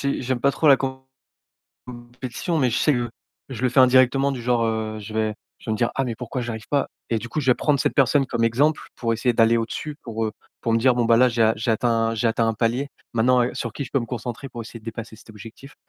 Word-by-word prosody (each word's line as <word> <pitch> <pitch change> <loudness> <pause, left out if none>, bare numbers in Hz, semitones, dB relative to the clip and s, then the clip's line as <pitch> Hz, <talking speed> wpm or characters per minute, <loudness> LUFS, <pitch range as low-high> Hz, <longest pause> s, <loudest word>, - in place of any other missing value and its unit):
c'est - - -5
j'aime 130 -1 -1
pas 140 +2 +3
trop 155 - +1
la 135 - +7 0.9
compétition, 125 +6 -6
mais 130 -3 +2
je 115 - 0
sais 150 - +3
que 120 -2 -1 0.4
je 130 -2 -7
le 130 - +3
fais 125 +2 +3
indirectement 130 +2 +4
du 130 - -4
genre, 120 -1 +1
heu, 110 -1 -2
je 105 +1 -9
vais 110 -1 -1 0.2
je - - -7
vais - - +1
me - - 0
dire: 120 +2 +1
«Ah 135 - +1
mais 120 - -3
pourquoi 125 +3 -5
j'arrive 115 -2 -6
pas?» 140 -1 +1 0.2
Et 115 - +1
du 120 +2 -8
coup, 155 - -2
je 130 -3 +2
vais 125 - +6
prendre 145 -2 +1
cette - - 0
personne 140 0 +3
comme 115 -1 -1
exemple, 140 +7 +2
pour 115 -2 -1
essayer 120 +2 +1
d'aller, 115 0 +4
au-dessus 115 +6 -4
pour, 115 -1 -3
heu, 110 - -4 0.3
pour 115 - -1
me 115 - +3
dire: 125 +1 +4
«Bon 120 - +1
bah 115 0 +4
là, 125 +2 +5
j'ai 115 -1 +1
a 110 0 +4
j'ai 110 +2 -1
atteint 115 0 +1
j'ai 115 +1 0
atteint 115 0 +1
un 115 - 0
palier. 120 +5 0 0.2
Maintenant, 125 +2 +3
heu, 120 - 0
sur 115 - -4
qui - - -5
je 130 - -11
peux 135 - +2
me 120 - -5
concentrer 120 +3 -5
pour 120 -2 -7
essayer 115 +1 -10
de - - -23
dépasser 115 -1 -7
cet 110 - -16
objectif?» 115 +6 -12
120 Hz, 270 wpm, -23 LUFS, 115-130 Hz, 0.9 s, la